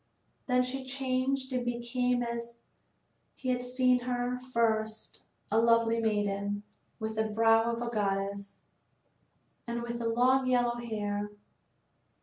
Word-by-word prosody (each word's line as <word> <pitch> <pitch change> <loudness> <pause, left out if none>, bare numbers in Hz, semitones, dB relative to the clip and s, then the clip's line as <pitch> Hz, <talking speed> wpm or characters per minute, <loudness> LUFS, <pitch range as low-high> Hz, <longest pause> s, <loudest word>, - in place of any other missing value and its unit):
Then 250 -1 +3
she 260 +1 -4
changed 260 0 -1
and 250 -1 0
became 245 +1 0
as 235 0 -4 0.8
he 255 - -4
had 250 -1 +1
seen 250 0 +3
her 245 0 -2
first 220 -3 -1 0.3
a 220 - +4
lovely 230 0 +4
maiden, 205 -2 0 0.3
with 220 -1 -4
the 220 - +2
brow 225 +1 +4
of 235 +1 -3
a - - -3
goddess, 200 -2 -2 1.1
and 235 0 -3
with 235 0 -4
long 250 +3 +3
yellow 245 -1 +2
hair. 210 -3 -3
235 Hz, 125 wpm, -30 LUFS, 220-250 Hz, 1.1 s, a